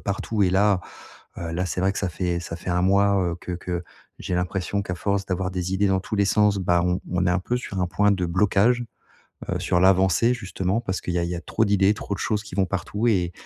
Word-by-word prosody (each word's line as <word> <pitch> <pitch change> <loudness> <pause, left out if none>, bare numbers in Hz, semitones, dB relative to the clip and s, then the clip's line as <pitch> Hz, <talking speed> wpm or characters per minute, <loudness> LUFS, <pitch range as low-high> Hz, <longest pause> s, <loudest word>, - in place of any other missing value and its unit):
partout 100 +1 -2
et 90 - +3
là, 95 0 +3 0.6
heu, 85 -1 -4
là, 90 +2 -1
c'est 90 - -3
vrai 95 +1 +2
que - - -4
ça 95 - -1
fait 85 0 -2
ça 85 -1 -6
fait 90 - -5
1 90 0 +1
mois, 100 +1 +3
heu, - - -3
que 90 - -6
que 90 0 -4 0.3
j'ai 90 - -3
l'impression 90 +2 -1
qu'à 90 - -4
force 100 +2 -1
d'avoir 90 0 -2
des 90 0 -3
idées 100 +1 +2
dans 95 -1 +2
tous 105 - -4
les 100 - +3
sens, 105 0 +3
bah, 90 -2 +2
on 90 +1 0
on 90 0 +1
est - - +3
un 90 - +2
peu 120 +6 -1
sur 100 -6 -4
un 90 - +1
point 105 +3 +2
de 90 -3 -1
blocage, 105 +7 +2 0.7
heu, - - -1
sur 90 - +1
l'avancée, 95 +5 +4
justement. 100 -1 -2
Parce 95 -5 -3
qu'il 90 - -3
y 90 - +1
a 85 - 0
il 85 - -2
y 90 - -2
a 85 - -5
trop 110 +4 0
d'idées, 100 0 +3
trop 105 - -5
de 95 - -5
choses 105 0 -1
qui 100 - -9
vont 95 -1 +2
partout 100 +4 -2
et 90 -5 +2
95 Hz, 265 wpm, -24 LUFS, 90-100 Hz, 0.7 s, l'avancée